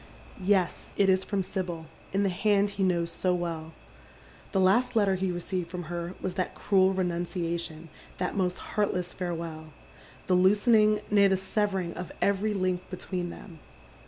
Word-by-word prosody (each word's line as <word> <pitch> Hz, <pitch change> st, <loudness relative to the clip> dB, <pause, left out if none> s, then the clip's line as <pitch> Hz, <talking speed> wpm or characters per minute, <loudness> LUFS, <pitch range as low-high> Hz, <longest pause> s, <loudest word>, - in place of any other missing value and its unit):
Yes, 185 Hz, -2 st, +1 dB
it 195 Hz, -1 st, +4 dB
is 190 Hz, 0 st, +4 dB
from 200 Hz, -1 st, -1 dB
Sibyl, 180 Hz, -4 st, -4 dB, 0.3 s
in 195 Hz, +1 st, +1 dB
the 195 Hz, -, +2 dB
hand 200 Hz, +2 st, +2 dB
he 200 Hz, -1 st, -5 dB
knows 170 Hz, -2 st, +1 dB
so 180 Hz, +1 st, +1 dB
well. 165 Hz, -2 st, -4 dB, 0.8 s
The 195 Hz, -, +1 dB
last 220 Hz, +7 st, +3 dB
letter 205 Hz, -3 st, +4 dB
he 190 Hz, 0 st, 0 dB
received 175 Hz, 0 st, -3 dB
from 180 Hz, -1 st, -5 dB
her 170 Hz, +1 st, -4 dB
was 185 Hz, -, -3 dB
that 185 Hz, -1 st, -2 dB
cruel 190 Hz, -2 st, +3 dB
renunciation, 170 Hz, -3 st, -2 dB, 0.3 s
that 180 Hz, -, -2 dB
most 185 Hz, -2 st, 0 dB, 0.2 s
heartless 180 Hz, -4 st, 0 dB
farewell— 165 Hz, -3 st, -5 dB, 0.5 s
the 185 Hz, -, +1 dB
loosening, 210 Hz, +3 st, +4 dB
nay, 200 Hz, -1 st, +6 dB
the 190 Hz, -1 st, +2 dB
severing 190 Hz, -2 st, -1 dB
of 180 Hz, 0 st, -6 dB
every 200 Hz, +1 st, +1 dB
link 185 Hz, -2 st, 0 dB
between 180 Hz, -1 st, -4 dB
them. 170 Hz, -2 st, -11 dB
185 Hz, 160 wpm, -28 LUFS, 175-200 Hz, 0.8 s, nay